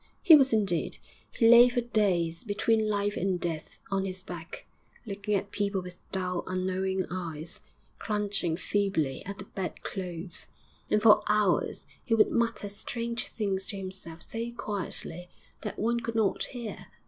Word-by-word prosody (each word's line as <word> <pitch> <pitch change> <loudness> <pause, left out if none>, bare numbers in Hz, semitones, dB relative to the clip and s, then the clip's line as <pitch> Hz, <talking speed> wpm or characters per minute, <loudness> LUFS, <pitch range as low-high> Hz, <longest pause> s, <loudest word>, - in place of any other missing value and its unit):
He 335 -5 +10
was 270 -3 +5
indeed; 200 -6 +1 0.3
he 230 - +3
lay 240 +1 +9
for 245 0 0
days, 185 -8 +1
between 220 +1 +1
life 205 0 0
and 185 -2 0
death, 165 -3 -4
on 195 -1 +1
his 185 -1 -4
back, 170 -3 -8 0.4
looking 205 0 -2
at 200 +1 -2
people 200 -1 0
with 180 -1 -9
dull, 180 -2 -1
unknowing 185 0 -1
eyes, 170 -2 -5 0.4
clutching 205 -6 -1
feebly 190 -9 0
at 200 0 -5
the 190 - -7
bed 190 -2 -5
clothes. 180 -2 -6 0.4
And 210 - +2
for 210 -2 +8
hours 210 -3 +2 0.2
he 225 - +2
would 215 - +4
mutter 230 -3 0
strange 235 +3 -2
things 195 -3 -2
to 200 - -5
himself 185 -4 -7
so 230 +1 -4
quietly 180 -5 -5 0.3
that 210 - -5
one 235 +3 +1
could 230 -1 -4
not 215 -3 +2
hear. 240 -4 -7
200 Hz, 155 wpm, -29 LUFS, 185-220 Hz, 0.4 s, He